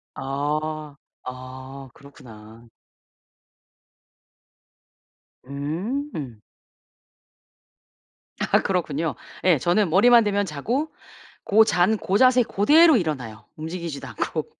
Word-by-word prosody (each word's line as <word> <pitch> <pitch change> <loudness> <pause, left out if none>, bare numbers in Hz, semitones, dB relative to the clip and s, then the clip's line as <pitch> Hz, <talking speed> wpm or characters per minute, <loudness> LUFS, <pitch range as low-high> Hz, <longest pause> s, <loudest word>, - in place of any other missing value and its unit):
아. 150 +2 -3 0.3
아 130 +1 -9
그렇구나. 115 -5 -15 2.8
음. 155 - -5 2.1
아 - - +4
그렇군요. 160 -5 -2 0.3
예. 180 -4 +4
저는 175 +7 +1
머리만 230 +7 +6
대면 205 -1 0
자고 235 - -3 0.5
고 220 +2 +5
잔 185 +2 +2
고 195 0 0
자세 255 0 +5
그대로 300 - +5
일어나요. 130 - -4
움직이지도 160 -3 -6
않고. 120 - -3
155 Hz, 170 characters per minute, -23 LUFS, 135-205 Hz, 2.8 s, 머리만